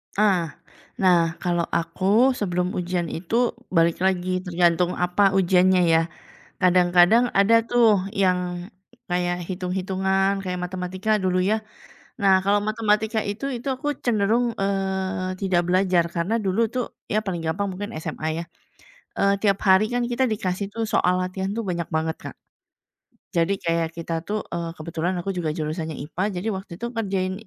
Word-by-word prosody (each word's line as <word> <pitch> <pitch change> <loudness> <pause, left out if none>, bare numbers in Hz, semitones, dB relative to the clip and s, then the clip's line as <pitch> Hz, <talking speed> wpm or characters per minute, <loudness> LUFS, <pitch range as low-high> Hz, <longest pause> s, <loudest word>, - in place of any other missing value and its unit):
Ah. 190 -6 +2 0.4
Nah, 170 -3 +3
kalau 175 -1 0
aku 205 +9 +2
sebelum 180 -5 -1
ujian 175 -1 -1
itu 230 +9 0 0.2
balik 170 0 +2
lagi 185 -1 0
tergantung 175 -1 +1
apa 180 +3 +3
ujiannya 185 0 +4
ya? 165 - +5 0.6
Kadang-kadang 180 +6 +4
ada 200 +3 +4
tuh 225 -5 +3
yang 180 -2 0 0.4
kayak 175 0 -1
hitung-hitungan, 190 +1 0
kayak 180 -1 -3
matematika 185 +4 -1
dulu 185 -2 +1
ya. 215 +4 0 0.6
Nah 195 -1 +5
kalau 205 +1 +3
matematika 215 +1 +1
itu 225 +7 -3
itu 250 +1 -5
aku 290 +3 -5 0.2
cenderung, 230 +2 +2
eee, 190 -1 -2
tidak 185 -3 +2
belajar 180 -1 +2
karena 180 +7 0
dulu 215 +2 0
itu 255 - -3 0.3
ya 215 +1 0
paling 175 -4 -3
gampang 165 +5 -1
mungkin 205 +2 -5
SMA 155 0 -4
ya, 170 - -3 0.7
eee, 200 0 +3
tiap 200 -1 +2
hari 190 +2 +5
kan 245 +1 -1
kita 255 +2 +1
dikasih 200 -2 -2
tuh 230 - -1
soal 180 -4 +2
latihan 190 +1 -3
tuh 230 - -2
banyak 175 -3 -3
banget 160 0 -1
Kak. - - -9 1.0
Jadi 175 +2 +1
kayak 165 -1 -1
kita 165 0 -5
tuh, 210 +1 -2
eee, 170 -1 -3
kebetulan 165 +2 -3
aku 195 - -2
juga 165 -5 -2
jurusannya 155 0 -3
IPA. 160 +6 -4
Jadi 180 +5 -3
waktu 190 -2 -6
itu 235 +7 -6
ngerjain 195 -5 -1
185 Hz, 150 wpm, -23 LUFS, 175-205 Hz, 1.0 s, ya